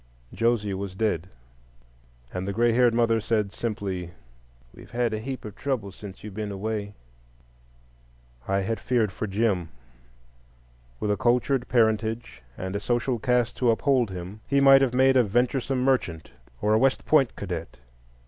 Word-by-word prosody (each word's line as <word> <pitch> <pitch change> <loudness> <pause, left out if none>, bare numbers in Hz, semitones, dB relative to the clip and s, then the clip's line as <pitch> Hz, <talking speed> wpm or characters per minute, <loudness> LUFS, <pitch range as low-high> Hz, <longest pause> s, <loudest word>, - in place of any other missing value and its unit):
Josie 115 -3 +1
was 95 -1 -5
dead, 95 -5 -1 1.0
and 90 +1 -3
the 100 - -2
gray 120 +3 +3
haired 120 0 +4
mother 115 -1 +2
said 105 -2 0
simply, 95 -6 -3 0.6
"We've - - -14
had 120 -1 0
a 110 - -2
heap 130 +2 -6
of 105 -1 -8
trouble 125 -9 -2
since 95 0 -11
you've 105 -2 -8
been 105 0 -4
away." 105 0 -4 1.5
I 100 0 +1
had 110 +4 -2
feared 115 -5 +1
for 110 - -4
Jim. 95 -4 0 1.3
With 105 - 0
a 105 - +1
cultured 125 +3 +1
parentage 110 - 0 0.2
and 95 +1 -4
a - - 0
social 120 +3 0
caste 120 +1 +1
to 125 - +2
uphold 125 0 +2
him, 95 +3 -7
he 140 - +2
might 135 0 +7
have 130 -2 +1
made 130 +1 +5
a 125 - +6
venturesome 125 +4 0
merchant 105 -12 0 0.3
or 105 - +3
a 110 - +4
West 135 +2 +2
Point 140 -5 +3
cadet. 90 -7 -6
110 Hz, 160 wpm, -26 LUFS, 100-125 Hz, 1.5 s, might